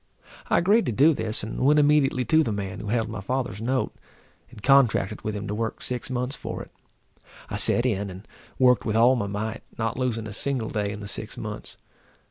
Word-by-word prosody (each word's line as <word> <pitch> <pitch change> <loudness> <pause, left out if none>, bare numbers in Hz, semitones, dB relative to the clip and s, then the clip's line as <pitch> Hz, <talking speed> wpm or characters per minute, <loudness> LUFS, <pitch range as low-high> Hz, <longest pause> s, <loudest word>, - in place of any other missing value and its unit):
I - - +4
agreed 205 +6 +3
to - - +1
do 145 +9 +5
this, 110 -6 -3
and 110 - -5
went 145 +4 +4
immediately 145 -4 +3
to 160 0 +4
the 115 - -2
man 100 -2 -4
who - - -6
held 110 +1 0
my 110 -2 -6
father's 120 -2 -3
note, 130 +3 -1 0.6
and 105 - -14
contracted 135 -8 +3
with 110 -1 -3
him 105 0 -5
to 105 - -3
work 110 +1 -3
six 125 0 -1
months 125 +2 -2
for - - -6
it. - - -15 0.8
I - - -2
set 120 - +3
in, 100 -5 0
and 95 +3 -10 0.3
worked 125 -1 +4
with 110 - -1
all 120 +3 +5
my 110 -5 -2
might, 105 +2 -4 0.2
not 115 +1 -2
losing 115 -4 -1
a 105 - -7
single 125 0 -2
day 105 -1 -1
in 105 0 -7
the 100 - -6
six - - -6
months. - - -7
115 Hz, 215 wpm, -25 LUFS, 105-130 Hz, 0.8 s, do